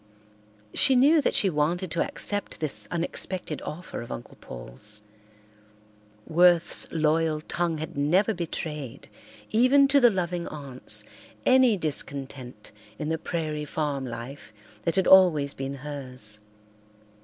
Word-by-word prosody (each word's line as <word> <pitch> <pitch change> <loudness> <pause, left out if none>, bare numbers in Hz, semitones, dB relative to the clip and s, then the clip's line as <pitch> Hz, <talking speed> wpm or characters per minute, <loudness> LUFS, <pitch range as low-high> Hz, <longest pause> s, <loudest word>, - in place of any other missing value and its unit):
She 270 -3 +5
knew 295 +5 +5
that - - 0
she 200 - +4
wanted 170 +2 -1
to 170 - +1
accept 205 0 -4
this 155 -3 +5
unexpected 175 -1 -3
offer 165 -2 -7
of 115 - -9
Uncle - - -8
Paul's. 85 - -8 1.2
Worth's 175 +1 +3
loyal 160 0 +1
tongue 170 0 -2
had 155 0 -6
never 175 +10 +2
betrayed, 150 - -6 0.4
even 255 +5 +5
to 280 +1 +5
the 245 -2 +6
loving 175 -3 -2
aunts, 140 -4 -2 0.4
any 255 -4 +5
discontent 135 - -5 0.3
in 150 - -4
the 160 0 -1
prairie 155 -3 -3
farm 145 -2 -3
life 120 -1 -8 0.3
that 165 - +1
had 190 -2 +2
always 165 -7 +5
been 135 +1 -5
hers. 130 -7 -6
155 Hz, 125 wpm, -26 LUFS, 140-180 Hz, 1.2 s, the